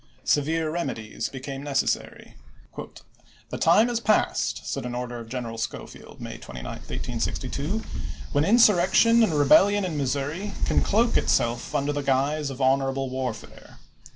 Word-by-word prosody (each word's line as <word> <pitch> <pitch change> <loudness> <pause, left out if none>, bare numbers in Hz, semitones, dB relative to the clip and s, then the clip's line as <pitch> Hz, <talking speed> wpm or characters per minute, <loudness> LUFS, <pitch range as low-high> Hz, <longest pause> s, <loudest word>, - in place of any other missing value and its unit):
Severe 155 +2 +1
remedies 115 -10 -4
became 135 +1 -7
neces 145 -2 +1
sary. - - -5 0.6
" - - -22
The - - -4
time 210 +8 +5
is 240 -2 -1
past," 215 -2 +1
said - - -3
an 125 0 -5
order 125 -1 -4
of 115 -1 -10
General 115 -2 -5
Schofield - - -7
(May - - -7
29, 60 -1 -9
1862), 135 - -4 0.2
" - - -11
when 145 - +2
insurrection 215 +2 +5
and 220 - +3
rebellion 195 +8 +5
in 165 -4 -3
Missouri 145 +9 -2
can - - +2
cloak 230 +3 +2
itself 120 0 0
under 145 +1 0
the 145 - -2
guise 140 +2 0
of 135 -1 -8
honorable 135 0 +1
warfare. 125 -4 -6
140 Hz, 150 wpm, -25 LUFS, 125-175 Hz, 0.6 s, time